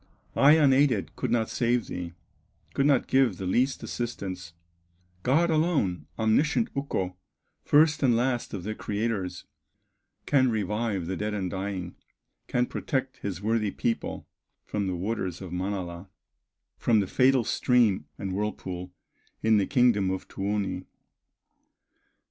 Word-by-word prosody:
I 140 +2 +7
unaided 140 -7 +3
could - - -2
not 115 -2 +1
save 120 -1 +1
thee, 90 -1 -6 0.6
Could 140 - +2
not 140 -4 +3
give 130 -8 +3
the 95 - -5
least 125 +9 +1
assistance; 95 -7 -5 0.7
God 160 - +3
alone, 140 - +1
omniscient 150 - +2
Ukko, 95 -10 -2 0.5
First 155 +1 +4
and 125 -4 +4
last 120 0 0
of 95 - -6
the 110 +3 -3
creators, 105 -4 -3 0.8
Can 130 -3 +3
revive 105 -3 -1
the 95 +3 -3
dead 105 +2 -2
and 95 -3 -2
dying, 95 -2 -4 0.5
Can 125 0 +1
protect 130 0 -3
his 100 -1 -5
worthy 110 -1 +1
people 115 +4 -3 0.4
From 100 -2 -2
the 95 - -1
waters 95 -2 -3
of 95 -3 -8
Manala, 90 -1 -4 0.7
From 115 -2 +3
the 100 - +1
fatal 130 +5 +3
stream 115 -4 +2
and 95 -2 -4
whirlpool, 95 -3 -4 0.5
In 110 -1 +5
the 100 - +1
kingdom 120 -8 +3
of 95 0 -3
Tuoni." 95 -2 -2
105 Hz, 130 wpm, -27 LUFS, 95-125 Hz, 0.8 s, I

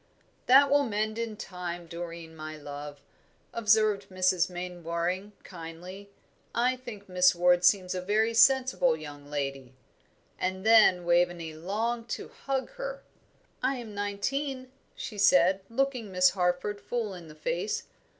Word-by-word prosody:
"That 275 +2 +7
will 285 0 +5
mend 215 0 -2
in 225 -2 -4
time, 175 -2 -6
Doreen, 170 -1 -8
my 155 0 -7
love," 145 0 -8 0.5
observed 215 -2 +2
Mrs. 185 -1 +2
Mainwaring, 180 +2 -3
kindly. 180 +3 -9 0.5
"I 250 +2 +2
think 235 -5 -10
Miss 180 0 +4
Ward 175 0 +4
seems 185 -1 +3
a 185 - -3
very 215 +4 +1
sensible 260 -3 +4
young 145 -2 -10
lady." 135 -3 -4 0.6
And 190 +2 -2
then 215 -6 +6
Waveney 175 -2 +1
longed 225 +8 -3
to - - -9
hug 270 -1 -3
her. - - -5 0.6
"I 265 +2 +1
am 235 -4 -8
nineteen," 255 +7 -3 0.2
she 210 -4 -7
said, 190 -1 +5
looking 250 -3 -1
Miss 185 0 +4
Harford 180 +3 -1
full 230 -5 -3
in 175 -3 -10
the 155 - -12
face. 175 +6 -2
190 Hz, 135 wpm, -28 LUFS, 175-225 Hz, 0.6 s, That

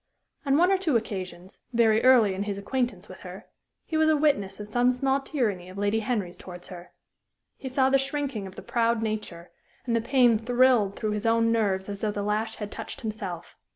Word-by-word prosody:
On 275 +1 +4
one 355 +4 +4
or 385 - +3
two 315 -10 +2
occasions, 185 -4 -7
very 225 -2 +3
early 245 -6 +6
in 190 - -4
his 200 - -3
acquaintance 210 -2 -2
with 185 - -11
her, 185 +1 -10 0.4
he 315 - -2
was 315 0 +4
a 310 - +4
witness 280 -12 +1
of 210 - -5
some 245 +3 +2
small 270 +2 0
tyranny 210 - -2
of 185 - -11
Lady 205 +2 +1
Henry's 210 -6 -2
towards 180 -1 -10
her. 175 -1 -10 0.6
He 265 - -7
saw 265 +1 +2
the 275 - +4
shrinking 270 -6 -3
of 190 - -12
the - - -9
proud 230 -1 0
nature, 210 -6 -5 0.3
and 235 -2 0
the 230 - +1
pain 240 -2 +3
thrilled 240 -3 +3
through 215 - -2
his 210 +2 -2
own 230 0 +3
nerves 200 -4 0
as 200 -1 -6
though 215 - 0
the 205 -1 -3
lash 215 +2 -1
had 210 -1 -6
touched 225 +4 -7
himself. 200 -7 -6
220 Hz, 210 wpm, -26 LUFS, 200-255 Hz, 0.6 s, early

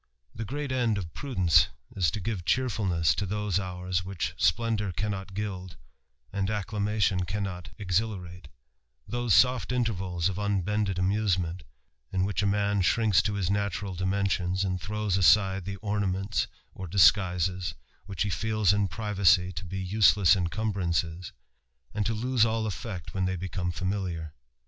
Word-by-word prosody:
The 115 - -5
great 145 +4 -4
end 120 -5 +1
of 85 -5 -5
prudence 90 - +3 0.3
is 90 -6 +2
to 90 - -4
give 100 -2 -3
cheerfuhiess 95 -7 +1
to 100 - -2
tliose 105 -1 -1
hours 90 -1 -3
which 95 -1 -3
splendour 110 -4 +1
cannot 95 +1 -4
gild, 95 -3 -5 0.6
and 100 -1 -1
acclamation 105 -2 0
caniioi 95 -2 -4
exhilarate; 90 -4 -2 0.6
those 120 -5 +1
sofl 125 +4 +3
intervals 95 -8 0
of 95 0 -3
unbended 100 -1 0
amusemeDt, 90 -2 0 0.5
b) - - -4
which 95 +3 +1
a 100 - +1
man 100 0 +1
shrinks 105 -1 +3
to 105 +2 -2
his 95 -2 0
natural 100 -1 -1
dimensions, 95 0 0
and 95 -2 -2
throws 105 -1 -1
aside 95 0 +4
the 100 0 -4
ornaments 100 0 -1 0.3
or 95 - -7
disguisesj 90 0 +3 0.3
which 95 -2 -2
he 100 - -2
feels 110 +2 +2
in 100 -1 +1
privacy 100 -4 +2
to 90 +1 -6
be 95 +2 -5
useless 100 -1 +4
incumbrances, 90 -2 -1 0.6
and 105 -1 0
to 115 - -1
lose 125 +1 +2
all 110 0 +1
effect 100 -3 -5
when 95 -1 0
they 95 0 -1
become 90 0 -3
familiar. 85 -3 -3
95 Hz, 145 wpm, -28 LUFS, 90-105 Hz, 0.6 s, aside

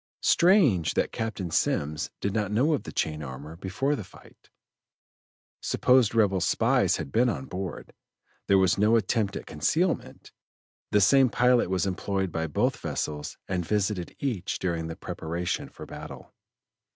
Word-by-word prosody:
Strange 170 - +4
that - - +1
Captain 105 -6 -4
Semmes 75 -1 0
did 100 - -1
not 105 -2 0
know 130 +9 +2
of 145 - -2
the - - -6
chain 75 -1 -2
armor 70 +3 -8
before 95 - -1
the 110 - -6
fight; - - -18 1.1
supposed 125 -3 +3
rebel 100 -4 +3
spies - - +2
had 70 - -6
been 125 +2 +3
on 130 - -3
board, 95 -5 -6 0.5
there 100 - +5
was 95 0 +3
no 105 +3 +4
attempt 105 -1 0
at - - -6
concealment; 160 - -1 0.6
the 105 - +3
same 135 +5 +5
pilot 125 -3 +3
was 95 0 0
employed 95 0 -2
by 80 0 -2
both 75 - 0
vessels 75 -1 -4
and 90 -2 -1
visited 100 -1 -1
each 115 -10 -2
during 85 -3 -2
the 80 - -6
preparation 85 +2 -4
for - - -11
battle. - - -10
95 Hz, 150 wpm, -27 LUFS, 85-120 Hz, 1.1 s, there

